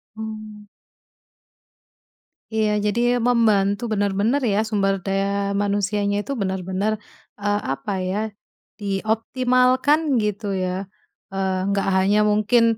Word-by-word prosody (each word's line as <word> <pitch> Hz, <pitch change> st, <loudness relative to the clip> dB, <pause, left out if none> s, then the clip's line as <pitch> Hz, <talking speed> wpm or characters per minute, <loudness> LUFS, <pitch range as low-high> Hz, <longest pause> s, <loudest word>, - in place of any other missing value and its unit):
Mmm. 215 Hz, -1 st, -8 dB, 1.9 s
Iya 215 Hz, -1 st, +2 dB
jadi 240 Hz, +4 st, +2 dB
membantu 225 Hz, -2 st, +2 dB
benar-benar 205 Hz, +4 st, +1 dB
ya, 210 Hz, -1 st, +2 dB
sumber 195 Hz, -2 st, +2 dB
daya 195 Hz, 0 st, 0 dB, 0.4 s
manusianya 205 Hz, 0 st, 0 dB
itu 275 Hz, -, -7 dB
benar-benar, 190 Hz, +2 st, -1 dB, 0.5 s
eee, 205 Hz, 0 st, +1 dB
apa 135 Hz, +9 st, -5 dB, 0.2 s
ya 195 Hz, -, -1 dB, 0.6 s
dioptimalkan 250 Hz, +7 st, +2 dB, 0.2 s
gitu 210 Hz, -1 st, -2 dB
ya. 185 Hz, +1 st, -2 dB, 0.5 s
Eee, 190 Hz, -1 st, -1 dB
nggak 195 Hz, -1 st, 0 dB
hanya 200 Hz, +3 st, +3 dB
mungkin, 210 Hz, +3 st, +3 dB
205 Hz, 100 wpm, -22 LUFS, 195-220 Hz, 1.9 s, hanya